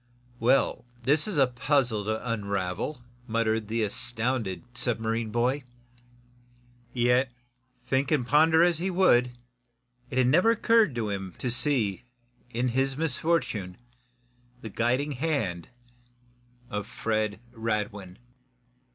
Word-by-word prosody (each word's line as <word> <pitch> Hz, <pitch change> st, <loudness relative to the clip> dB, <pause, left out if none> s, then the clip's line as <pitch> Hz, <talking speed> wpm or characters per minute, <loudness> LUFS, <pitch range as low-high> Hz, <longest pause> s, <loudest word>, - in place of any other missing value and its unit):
"Well, 125 Hz, +1 st, +2 dB, 0.2 s
this 145 Hz, -, +3 dB
is 200 Hz, -7 st, -2 dB
a 135 Hz, -, +6 dB
puzzle 125 Hz, -3 st, 0 dB
to 110 Hz, +3 st, -3 dB
unravel!" 100 Hz, +3 st, -3 dB, 0.2 s
muttered 110 Hz, -1 st, 0 dB
the 115 Hz, +1 st, -1 dB
astounded 115 Hz, -4 st, 0 dB
submarine 115 Hz, -1 st, -1 dB
boy. 125 Hz, +5 st, 0 dB, 1.3 s
Yet, 125 Hz, +2 st, +2 dB, 0.5 s
think 130 Hz, +2 st, 0 dB
and 145 Hz, -6 st, +2 dB
ponder 160 Hz, +4 st, +5 dB
as 175 Hz, -2 st, +3 dB
he 185 Hz, +3 st, -1 dB
would, 125 Hz, -10 st, +3 dB, 0.7 s
it 130 Hz, 0 st, +2 dB
never 170 Hz, -, +4 dB
occurred 225 Hz, -, +3 dB
to 110 Hz, -3 st, -2 dB
him 95 Hz, -3 st, -5 dB
to 125 Hz, -, -2 dB
see, 120 Hz, -5 st, +1 dB, 0.5 s
in 125 Hz, +1 st, -1 dB
his 135 Hz, +2 st, 0 dB
misfortune, 145 Hz, -, -1 dB, 0.8 s
the 110 Hz, -, -7 dB
guiding 125 Hz, +8 st, 0 dB
hand 125 Hz, -, -2 dB, 1.0 s
of 105 Hz, 0 st, -3 dB
Fred 110 Hz, -1 st, -2 dB
Radwin! 105 Hz, -5 st, -3 dB
120 Hz, 110 wpm, -27 LUFS, 110-140 Hz, 1.3 s, a